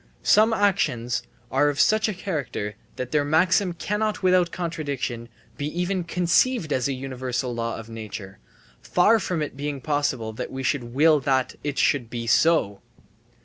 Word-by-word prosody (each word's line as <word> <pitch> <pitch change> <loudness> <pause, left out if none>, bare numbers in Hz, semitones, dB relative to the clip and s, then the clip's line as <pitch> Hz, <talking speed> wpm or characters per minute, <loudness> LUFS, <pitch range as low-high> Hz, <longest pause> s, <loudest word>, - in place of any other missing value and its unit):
Some 215 +2 +5
actions 180 - +1 0.3
are 145 - +3
of 145 - -3
such 215 0 +3
a - - -2
character 145 - -4 0.2
that 125 -1 -5
their 150 -1 +2
maxim 180 +5 +2
cannot 210 +4 -2
without 180 -2 +3
contradiction 140 -9 -4 0.3
be 145 - -2
even 180 0 -1
conceived 175 - +2
as 130 0 +1
a 140 - -1
universal 130 -1 -3
law 115 0 -2
of 115 - -9
nature, 110 -4 -8 0.4
far 215 +6 +3
from 180 -5 -2
it 150 - -6
being 145 0 -4
possible 135 -6 -1
that - - -6
we 135 0 -5
should 125 +1 0
will 155 +1 +5
that 135 -1 0
it 145 -2 -3
should 125 -5 +2
be 120 -1 -4
so. 115 -6 +3
145 Hz, 160 wpm, -24 LUFS, 125-180 Hz, 0.4 s, Some